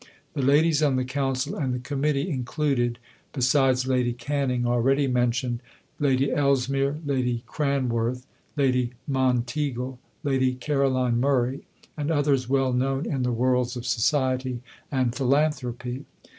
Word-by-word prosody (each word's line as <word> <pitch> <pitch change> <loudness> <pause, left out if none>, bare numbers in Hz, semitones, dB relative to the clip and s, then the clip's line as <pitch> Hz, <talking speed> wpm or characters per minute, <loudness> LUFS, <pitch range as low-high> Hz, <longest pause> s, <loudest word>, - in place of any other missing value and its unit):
The 140 - -2
ladies 150 +3 +4
on 145 -3 +3
the 130 0 0
Council 135 0 -1
and 130 -4 -1
the - - -3
Committee 140 +3 -1
included 130 -4 -1 0.4
(besides 130 -1 +3
Lady 125 -2 +1
Canning 130 -1 -1
already 130 +4 +2
mentioned) 125 -1 0 0.4
Lady 135 -1 +2
Ellesmere, 140 0 +1
Lady 125 -4 0
Cranworth, 125 -3 -1 0.3
Lady 125 -3 +1
Monteagle, 130 0 -1 0.2
Lady 130 -3 +1
Caroline 130 -3 +1
Murray, 130 0 0 0.3
and 150 0 -3
others 145 -5 +1
well 135 -1 +2
known 135 +3 0
in 135 -3 -2
the 125 0 +1
worlds 125 +1 +1
of 120 -1 -6
society 130 0 0 0.3
and 130 -4 +1
philanthropy. 130 -2 0
130 Hz, 125 wpm, -25 LUFS, 125-140 Hz, 0.4 s, ladies